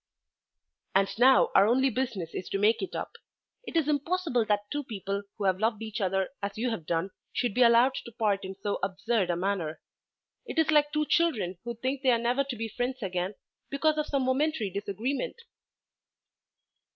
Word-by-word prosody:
"And 195 0 +4
now 260 +2 +6
our 195 - +6
only 260 +3 +3
business 225 -9 -3
is 185 - -5
to - - -1
make 210 +3 +3
it 385 - -4
up. - - -5 0.5
It - - -2
is 315 -3 +2
impossible 300 -4 +1
that 205 -1 -1
two 290 0 -2
people 200 -4 -4 0.2
who 210 - -4
have 190 -1 +2
loved 220 0 0
each 220 0 -5
other 190 0 0
as 200 0 -4
you 240 +2 0
have 170 -9 -5
done 170 +3 -1 0.2
should 245 -4 -1
be 250 - +1
allowed 240 +2 +6
to 235 - -7
part 215 -4 0
in 190 0 -6
so 200 +1 -3
absurd 200 +1 0
a 175 - +1
manner. 175 -4 -2 0.7
It - - -6
is 320 -1 +3
like 295 -1 +4
two 300 0 +1
children 215 - +1
who 235 0 -4
think 260 +4 -2
they 265 - +3
are 240 - +5
never 240 +4 +1
to 265 -2 -4
be 225 0 -3
friends 245 +2 -3
again 185 +1 -2 0.3
because 305 +2 +1
of 300 - -1
some 275 -2 0
momentary 260 -4 0
disagreement." 215 - -3
230 Hz, 190 wpm, -28 LUFS, 195-265 Hz, 0.7 s, now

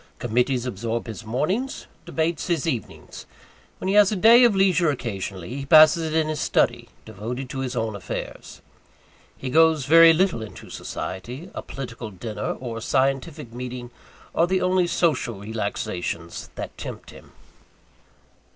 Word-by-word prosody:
Committees 125 +2 0
absorb 115 0 -3
his 115 0 -7
mornings 155 - -2 0.2
debates 160 0 -1
his 170 -5 0
evenings. 125 -9 -5 0.5
When - - -5
he 190 - +1
has 205 -1 +6
a - - 0
day 230 +6 +7
of 235 -4 +5
leisure 185 -4 +3
occasionally, 105 - -4
he 140 - -5
passes 155 +1 +6
it - - -2
in 160 -1 +2
his 155 -1 -3
study, 120 0 +1 0.2
devoted 120 +5 -6
to 135 - -5
his 130 -1 -3
own 110 -3 -2
affairs. 100 - -7 0.7
He 130 - -5
goes 160 -2 +4
very 165 +3 +8
little 170 -6 +1
into 110 - -10
society 125 - -6
a - - -5
political 120 -4 -7
dinner, 105 +3 -4
or 120 -3 -5
a - - -6
scientific 135 +1 -1
meeting 125 0 -6 0.4
are 170 - +3
the 185 +1 +1
only 185 -1 +2
social 160 -9 0
relaxations 100 -5 -4
that - - -6
tempt - - -8
him. - - -15
130 Hz, 150 wpm, -24 LUFS, 115-165 Hz, 0.7 s, very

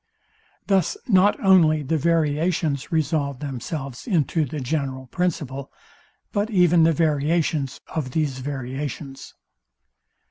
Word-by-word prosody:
Thus 195 - +1
not 200 -2 +4
only 160 -5 +5
the 145 +4 -1
variations 155 -1 0
resolve 145 -3 0
themselves 135 - -6
into 160 - +1
the 145 +3 -5
general 130 -1 -3
principle, 140 -3 -3 0.6
but 205 0 -1
even 175 -5 +4
the 165 +1 +5
variations 155 -2 0
of 150 -5 -3
these 140 -2 -1
variations. 135 +1 -6
150 Hz, 105 wpm, -23 LUFS, 135-170 Hz, 0.6 s, only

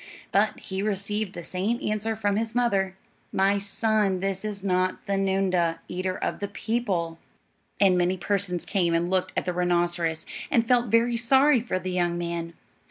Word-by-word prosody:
But - - +2
he 190 0 -4
received 205 0 -1
the 170 - -7
same 200 +8 -1
answer 215 +1 -1
from 205 -2 0
his 225 +2 -2
mother: 195 -6 +1 0.3
"My 195 +1 +2
son, 205 -1 +1
this 195 +1 -2
is 205 -2 -4
not 185 -1 0
the 200 - -1
noondah, 190 -3 +1
eater 185 +1 -3
of - - -3
the 200 - -2
people." 200 -7 -2 0.6
And 185 -3 +5
many 180 +1 +1
persons 185 -2 -1
came 175 -4 +1
and 170 +1 +1
looked 185 0 0
at - - 0
the 180 - -1
rhinoceros, 175 -2 0 0.2
and 230 -1 +2
felt 245 -1 +3
very 235 +2 +3
sorry 265 +2 +4
for 230 -5 -2
the 185 0 -4
young 175 -1 0
man. 170 -1 -3
195 Hz, 170 wpm, -26 LUFS, 180-215 Hz, 0.6 s, And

